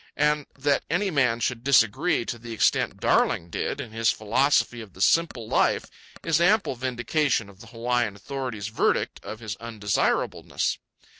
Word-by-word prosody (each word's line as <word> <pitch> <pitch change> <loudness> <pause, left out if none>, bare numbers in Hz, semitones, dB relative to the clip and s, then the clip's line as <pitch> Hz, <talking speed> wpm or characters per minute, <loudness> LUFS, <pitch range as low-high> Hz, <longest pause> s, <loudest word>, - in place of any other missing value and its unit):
And 150 -1 +1
that 140 0 +1
any 190 +5 0
man 125 -6 +2
should 120 0 -1
disagree 135 - +3
to 120 - -5
the 115 0 -8
extent 110 - +1
Darling 85 +1 +1
did - - -3
in 125 -6 -6
his 115 0 +1
philosophy 120 +2 +1
of 105 -5 -12
the - - -16
simple 145 -5 +2
life - - +2 0.4
is 165 0 +2
ample 200 -2 +3
vindication 125 -1 0
of 95 -2 -17
the - - -13
Hawaiian 120 -2 -1
authorities 115 -1 -5
verdict 110 - 0
of 110 +1 -8
his 110 -3 -5
undesirableness. 110 -4 -1
120 Hz, 155 wpm, -25 LUFS, 110-140 Hz, 0.4 s, disagree